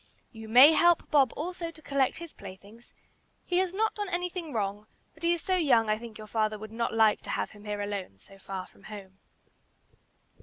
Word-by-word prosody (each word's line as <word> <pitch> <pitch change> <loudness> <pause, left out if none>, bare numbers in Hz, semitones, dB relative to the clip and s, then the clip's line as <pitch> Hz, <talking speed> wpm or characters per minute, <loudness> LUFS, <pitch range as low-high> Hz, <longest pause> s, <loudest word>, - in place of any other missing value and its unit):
You 220 -2 -10
may 255 +7 +9
help 345 +2 +3
Bob 275 -5 +4
also 340 +2 -4
to 330 - -14
collect 275 -2 0
his 335 -1 -9
playthings; 200 +4 -13 0.5
he 355 0 +1
has 375 -1 0
not 435 +4 0
done 415 -2 -4
anything 355 -2 -3
wrong, 210 -2 -3 0.3
but 320 - -21
he 340 0 +2
is 345 -1 -1
so 375 - +1
young 235 -10 +3
I 215 - 0
think 230 -2 -10
your 215 - -9
father 215 0 -1
would 215 +1 -9
not 230 +1 -2
like 220 -1 +3
to - - -11
have - - -2
him 210 0 -15
here 205 -1 -3
alone 200 - -5
so 195 - -16
far 190 -1 -6
from 195 - -21
home." 195 -2 -10
225 Hz, 205 wpm, -28 LUFS, 210-335 Hz, 0.5 s, may